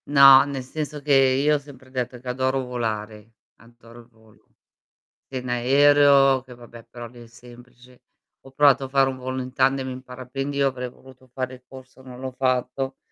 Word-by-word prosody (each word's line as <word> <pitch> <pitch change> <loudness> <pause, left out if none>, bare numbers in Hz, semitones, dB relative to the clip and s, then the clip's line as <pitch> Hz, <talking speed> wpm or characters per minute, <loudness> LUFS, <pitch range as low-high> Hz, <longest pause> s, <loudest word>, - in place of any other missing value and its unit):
No, 135 -2 +8
nel 140 -2 -5
senso 150 +3 -6
che 145 0 0
io 135 +2 +3
ho - - +1
sempre 135 -2 -16
detto 125 -1 -4
che 125 - -15
adoro 130 +1 -1
volare, 110 -3 -5 0.2
adoro 115 0 -18
il 115 - -16
volo. 110 -2 -26 0.7
Si 135 - -5
in 125 0 -7
aereo 135 +2 +4
che 130 -1 -13
vabbè 120 -1 -14
però 120 -1 -9
lì 120 +1 -15
è - - -16
semplice; 125 +2 -18 0.4
ho 135 - -16
provato 140 0 +4
a - - -5
fare 135 0 +3
un 130 - -5
volo 130 +1 -5
in 125 0 -8
tandem 135 0 +1
in 130 0 -8
parapendio, 135 +2 -3
avrei 125 -1 -4
voluto 130 +1 -19
fare 130 -1 -4
il 125 - -20
corso, 130 0 -15
non 125 -1 -12
l'ho 130 0 -6
fatto, 130 +1 -2
130 Hz, 190 wpm, -23 LUFS, 125-135 Hz, 0.7 s, No